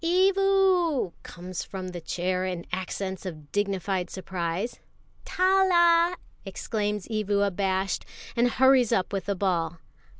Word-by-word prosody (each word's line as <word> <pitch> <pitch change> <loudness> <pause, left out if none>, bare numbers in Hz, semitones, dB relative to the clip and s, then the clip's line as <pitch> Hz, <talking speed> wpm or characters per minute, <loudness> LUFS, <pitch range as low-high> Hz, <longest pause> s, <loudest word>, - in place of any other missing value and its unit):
"Evu!" 370 - +3
comes 180 0 -7
from 185 -1 -6
the 175 -1 -7
chair 180 +2 -1
in 180 -2 -3
accents 190 +1 -4
of 155 -6 -8
dignified 195 -3 -1
surprise. 185 +3 -4 0.5
"Tala!" 360 -2 +4 0.3
exclaims 210 -3 -3
Evu 210 -2 +1
abashed, 190 -1 -1 0.3
and 240 +1 +3
hurries 260 -1 +4
up 200 -3 0
with 195 -2 -2
the 200 - 0
ball. 175 -3 -1
200 Hz, 120 wpm, -26 LUFS, 185-275 Hz, 0.5 s, Tala